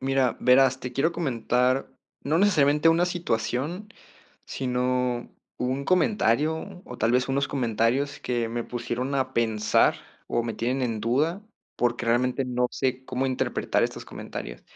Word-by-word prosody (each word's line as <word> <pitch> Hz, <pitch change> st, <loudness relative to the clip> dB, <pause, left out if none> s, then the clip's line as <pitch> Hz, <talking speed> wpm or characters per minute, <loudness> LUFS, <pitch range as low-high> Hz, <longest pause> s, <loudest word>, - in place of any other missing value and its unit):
Mira, 135 Hz, -2 st, +1 dB
verás, 130 Hz, +1 st, +4 dB
te 125 Hz, -, -6 dB
quiero 145 Hz, +7 st, +1 dB
comentar 125 Hz, -4 st, 0 dB, 0.3 s
no 155 Hz, +4 st, +1 dB
necesariamente 155 Hz, -6 st, +4 dB
una 170 Hz, +2 st, +4 dB
situación, 170 Hz, -, -2 dB, 0.6 s
sino 125 Hz, -1 st, -1 dB, 0.3 s
un 130 Hz, +2 st, -1 dB
comentario, 160 Hz, -, +1 dB
o 125 Hz, -, -9 dB
tal 115 Hz, +2 st, +2 dB
vez 125 Hz, +1 st, +2 dB
unos 140 Hz, +1 st, 0 dB
comentarios 125 Hz, +3 st, 0 dB
que 120 Hz, -2 st, -1 dB
me 120 Hz, +1 st, -3 dB
pusieron 125 Hz, +2 st, -3 dB
a 130 Hz, -1 st, 0 dB
pensar 110 Hz, -2 st, +2 dB, 0.3 s
o 120 Hz, -, 0 dB
me 115 Hz, -1 st, -4 dB
tienen 125 Hz, +3 st, -1 dB
en 115 Hz, -3 st, -1 dB
duda, 150 Hz, -, 0 dB, 0.3 s
porque 120 Hz, -1 st, 0 dB
realmente 125 Hz, +3 st, +1 dB
no 125 Hz, -1 st, 0 dB
sé 130 Hz, -1 st, -2 dB
cómo 130 Hz, +1 st, -2 dB
interpretar 130 Hz, -1 st, 0 dB
estos -, -, -2 dB
comentarios. -, -, -8 dB
130 Hz, 140 wpm, -26 LUFS, 120-140 Hz, 0.6 s, verás